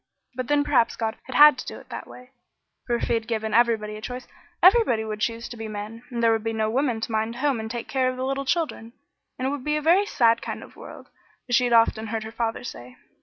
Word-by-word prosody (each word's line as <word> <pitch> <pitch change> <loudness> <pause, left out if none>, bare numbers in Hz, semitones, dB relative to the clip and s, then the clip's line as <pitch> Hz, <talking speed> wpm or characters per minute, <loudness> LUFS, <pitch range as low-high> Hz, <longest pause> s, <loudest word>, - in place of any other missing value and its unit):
But 255 -1 -4
then 290 0 +3
perhaps 275 -5 +2
God 220 -1 -2
had 290 +1 +6
to - - -6
do - - -8
that - - -7
way, 250 +1 -14 0.6
for 240 - +1
if - - -3
he - - 0
had 225 -1 -1
given 220 -1 -2
everybody 220 -3 +2
a - - -10
choice, 250 +2 -7 0.4
everybody 370 - +5
would 215 -1 -5
choose 230 +2 -2
to 240 - -9
be 225 0 -5
men, 215 +2 -7
and 235 -2 -3
there 230 - +5
would 225 -1 0
be 225 0 -2
no 220 -1 0
women 250 -2 0
to 225 - -4
mind 220 +1 -1
the - - -9
home 270 -2 0
and 220 0 -5
take 235 0 -5
care 260 -1 +1
of 255 - -5
the 260 - -2
little 275 +1 -2
children, 265 -7 -2 0.4
and 255 - -2
it - - 0
would 285 -3 -4
be 300 +1 0
a - - 0
very 365 +6 +4
sad 230 - +3
kind - - -6
of - - -15
world, - - -12 0.4
as 245 - -4
she 250 +1 +4
had 240 - +1
often 225 -1 +3
heard 220 0 -3
her 220 - -8
father 230 0 -3
say. 125 - -9
235 Hz, 265 wpm, -24 LUFS, 225-260 Hz, 0.6 s, had